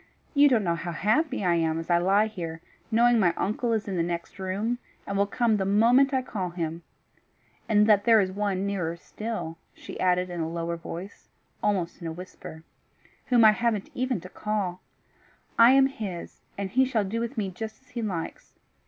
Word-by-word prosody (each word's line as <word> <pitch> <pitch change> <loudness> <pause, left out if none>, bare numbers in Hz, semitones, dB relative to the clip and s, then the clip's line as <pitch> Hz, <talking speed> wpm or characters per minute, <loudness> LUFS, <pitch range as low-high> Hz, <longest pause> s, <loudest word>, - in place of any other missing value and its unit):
You 290 -1 +6
don't 235 -5 +3
know 170 -2 +1
how 170 +1 -4
happy 225 - +1
I 175 - +3
am 165 -1 +1
as 165 +1 -4
I 170 - +5
lie 195 +4 +3
here, 170 -7 -6 0.3
knowing 235 +1 +4
my 175 -4 +3
uncle 230 +4 -1
is 220 -2 -1
in 190 -2 -2
the - - +2
next 170 +2 -4
room, 205 +6 -2 0.3
and 200 - -4
will 200 +1 +2
come 225 +1 +1
the 195 - 0
moment 235 +8 +4
I 260 -2 +1
call 190 -7 -3
him 165 -1 -4 0.9
and 210 -1 +5
that 210 -2 +4
there 225 -2 +6
is 190 -2 +1
one 200 -1 -1
nearer 180 -5 -2
still," 195 -4 -6 0.2
she - - -9
added 180 0 +1
in 175 - -5
a 160 - -2
lower 170 0 -3
voice, 170 +3 -9 0.3
almost 185 -5 -1
in 170 - -4
a - - -3
whisper, 160 -2 -10 0.6
"whom 240 -3 +5
I 215 - +9
haven't 215 -2 -1
even 255 -4 -1
to 185 - -10
call. 200 -4 -3 0.8
I 230 +1 +9
am 270 0 +6
his, 205 -10 -6 0.2
and 195 -1 -3
he 260 +5 +4
shall 245 -5 +1
do 210 +4 -3
with 235 +2 -4
me 200 -3 -1
just 220 +6 -7
as 255 - -28
he 240 - -5
likes. 180 -7 -5
200 Hz, 200 wpm, -27 LUFS, 175-230 Hz, 0.9 s, I